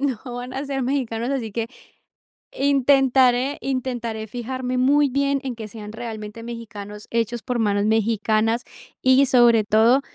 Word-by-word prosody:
no 265 -6 -1
van 245 +1 -6
a 270 +2 -4
ser 275 -1 -2
mexicanos, 245 -2 -1
así 250 -5 -2
que, 225 +2 -2 0.9
intentaré 270 -1 +3
intentaré 240 -4 -3
fijarme 250 +3 -4
muy 285 +3 +4
bien 280 +1 +1
en 260 -2 -3
que 220 -2 -7
sean 210 0 -9
realmente 220 -1 -7
mexicanos, 210 -3 -8
hechos 230 0 -1
por 250 -2 -2
manos 205 -2 +1
mexicanas 220 +1 +1 0.4
y, 260 +2 +5
sobre 240 -4 +5
todo, 225 +5 +4
240 Hz, 140 wpm, -22 LUFS, 220-265 Hz, 0.9 s, y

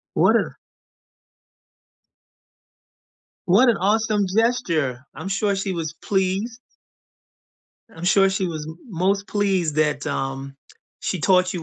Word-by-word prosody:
What - - +5
a - - -1 2.9
what 220 +8 +5
an 225 - +4
awesome 210 +1 +1
gesture, 180 - 0
I'm 195 - -6
sure 200 +1 0
she 195 0 -2
was 160 -3 -3
pleased. 200 +5 -1 1.3
I'm 165 -2 -9
sure 195 +1 +4
she 190 -1 -1
was 155 -3 -5
m 160 +2 -9
most 195 +2 0
pleased 190 -7 0
that, 150 -2 +1
um, 135 0 -3 0.5
she 185 - -2
taught 185 0 +3
you 175 -3 -4
190 Hz, 120 wpm, -22 LUFS, 160-200 Hz, 2.9 s, What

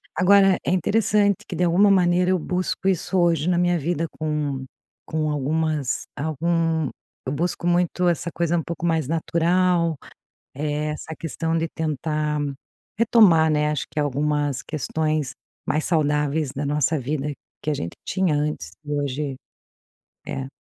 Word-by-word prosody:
Agora, 195 0 +5
é - - +1
interessante 205 +2 +2
que - - -6
de 180 - +1
alguma 190 +4 +5
maneira 180 -1 +3
eu 185 - +2
busco 185 +3 -2
isso 190 0 +1
hoje 170 -2 +2
na 175 - +2
minha 175 0 +2
vida, 165 +1 -1
com 150 -3 -2 0.4
com 155 -1 -1
algumas 150 -1 -1
algum 160 0 0 0.4
Eu 130 - -2
busco 170 +3 -1
muito 175 +1 +2
essa 170 0 0
coisa 170 0 +1
um 165 - -1
pouco 170 +1 -5
mais 160 -5 +1
natural. 170 0 +2 0.6
É, 150 +1 -2
essa 160 +1 -6
questão 165 0 -2
de 165 0 0
tentar 150 -1 -2 0.6
retomar, 205 -8 +5
né. 150 0 +2
Acho 150 - -2
que - - -3
algumas 145 -1 0
questões 155 -1 -2 0.3
mais 155 - 0
saudáveis 150 -2 +1
da 140 +2 -4
nossa 150 +2 +1
vida 145 +2 -2 0.3
que 150 - 0
a - - +1
gente 85 - -5
tinha 185 -5 +1
antes 145 - -2
e 150 - -6
hoje. 145 -1 -2 0.9
É 135 - -4
160 Hz, 150 wpm, -23 LUFS, 150-175 Hz, 0.9 s, Agora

